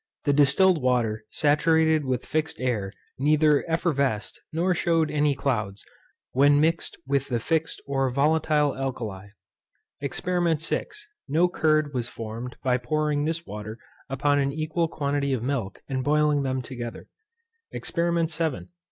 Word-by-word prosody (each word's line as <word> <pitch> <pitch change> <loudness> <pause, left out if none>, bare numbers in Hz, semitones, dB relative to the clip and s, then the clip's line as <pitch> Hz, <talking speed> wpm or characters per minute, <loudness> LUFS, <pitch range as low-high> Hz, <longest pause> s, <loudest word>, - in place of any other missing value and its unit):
The 145 - +2
distilled 155 +4 +4
water 115 -4 0
saturated 160 0 +3
with 130 -2 -1
fixed 155 +2 -2
air 110 -7 -1 0.3
neither 150 +1 +4
effervesced, 140 - 0
nor 175 +3 +1
shewed 165 -3 +1
any 150 -1 +2
clouds, 105 -8 -2 0.5
when 145 +2 +5
mixed 160 +2 0
with 140 0 0
the 120 -3 -1
fixed 160 +6 -1
or 135 -1 0
volatile 150 +1 +2
alkali. 115 -8 -4 0.7
EXPERIMENT 170 +2 0
VI. - - -1 0.4
No 160 +5 +3
curd 155 -4 +1
was 120 -2 -2
formed 115 +2 -7
by 125 -1 +2
pouring 150 +2 0
this 165 +2 -2
water 105 -1 -7 0.3
upon 145 +2 +1
an 140 0 +1
equal 155 +3 -1
quantity 140 -3 -1
of 120 -3 -2
milk, 125 -7 -3
and 130 -2 -2
boiling 150 0 +2
them 130 -1 -2
together. 120 -2 -7 0.6
EXPERIMENT 170 -1 -1
VII. 160 -2 -2
145 Hz, 135 wpm, -25 LUFS, 130-160 Hz, 0.7 s, when